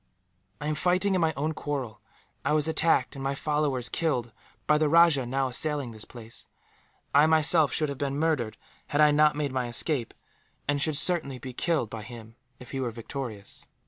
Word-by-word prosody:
"I 145 - -6
am 155 - 0
fighting 180 +5 +1
in 185 - +1
my 160 -1 +2
own 155 +3 -1
quarrel. 130 -9 -5 0.4
I - - +1
was 155 0 +2
attacked, 160 -1 +2
and 135 - -7
my 135 +1 -1
followers 145 -4 -1
killed, 125 -8 -1 0.3
by 150 0 +3
the 155 -1 +2
rajah 165 -5 +4
now 135 +1 -1
assailing 140 -1 0
this 110 -1 -10
place. 115 -2 -10 0.7
I, 145 +2 +6
myself, 160 -1 +4
should 155 - 0
have 140 - -6
been 140 -1 -2
murdered, 150 -8 -1 0.3
had 145 - -2
I 150 -1 +6
not 150 0 +4
made 145 -2 -2
my 130 -2 -2
escape; 120 0 -1 0.5
and 145 0 0
should 155 -1 +3
certainly 155 -5 +3
be 125 +1 -8
killed 150 -5 -1
by 115 - -6
him, 115 0 -11 0.2
if 125 - -12
he 135 - -4
were 130 -2 -1
victorious. 115 -2 -8
145 Hz, 190 wpm, -27 LUFS, 125-155 Hz, 0.7 s, I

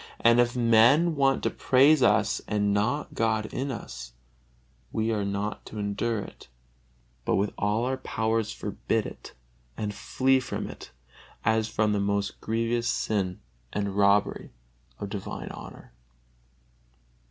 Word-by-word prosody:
And 115 +1 +5
if 120 0 +3
men 125 +8 +5
want 135 -1 +2
to - - +1
praise 140 +3 +4
us 110 -4 +3
and 105 -1 +1
not 115 +9 0
God 110 -1 +1
in 135 +2 -2
us, - - -7 0.8
we 110 +1 0
are 105 -2 0
not 100 +1 -3
to 110 - -9
endure 105 +2 -1
it, - - -11 0.8
but - - +1
with 100 +1 0
all 105 +3 0
our 130 +1 -1
powers 110 - -1
forbid - - -2
it - - -9 0.4
and 105 -1 -3
flee 130 +5 +2
from 130 - -4
it - - -10 0.6
as 110 -1 +2
from 105 -1 +1
the 105 - +1
most 100 0 -1
grievous 115 +1 0
sin 95 -4 -1 0.3
and 100 -1 -2
robbery 100 0 +2 0.5
of 100 - -5
divine 100 -1 -5
honor. - - -10
110 Hz, 140 wpm, -27 LUFS, 100-120 Hz, 0.8 s, And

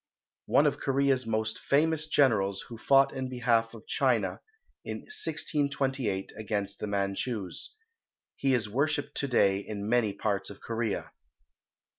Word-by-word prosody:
One - - +4
of - - +1
Korea's 135 -2 +1
most 110 0 -1
famous 155 +2 +2
generals, 105 -10 +3
who 115 - -10
fought 135 +2 +4
in 130 -1 -3
behalf 115 -2 +1
of 110 - -12
China 115 -9 +1 0.4
in - - -5
1628 140 - -1
against 100 -2 -3
the 105 - -3
Manchus. 100 - -3 0.6
He 135 -1 +2
is 115 -3 0
worshipped 145 +5 -1
to 140 - -1
day 100 -6 +3
in 100 0 -5
many 115 -2 +2
parts 100 -1 -2
of 100 - -10
Korea. 115 -2 -3
115 Hz, 135 wpm, -29 LUFS, 100-135 Hz, 0.6 s, One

